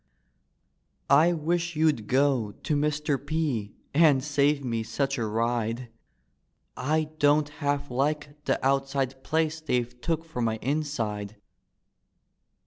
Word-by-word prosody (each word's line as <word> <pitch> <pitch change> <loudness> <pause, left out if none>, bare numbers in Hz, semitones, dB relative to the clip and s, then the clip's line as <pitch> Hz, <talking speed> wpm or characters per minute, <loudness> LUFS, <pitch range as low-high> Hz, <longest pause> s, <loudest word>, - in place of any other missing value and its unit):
" - - -47 0.2
I - - +3
wish 170 +1 -1
you'd 150 -9 +2
go 130 -5 +2
to 150 - -2
Mr. 150 -1 0
P., 145 -9 -2 0.2
And 145 -3 +5
save 145 -1 +1
me 115 -2 -1
such 135 +4 -2
a 115 - -1
ride; 115 +2 -1 0.9
I 155 +3 0
don't 145 +1 +4
half 145 -2 -2
like 145 +3 -2
the - - +2
outside 135 -1 0
place 160 0 0
They've 125 -4 -2
took 165 +2 -1
for 160 -7 -5
my 110 -1 +1
inside. 115 -7 -2
140 Hz, 125 wpm, -27 LUFS, 120-150 Hz, 0.9 s, And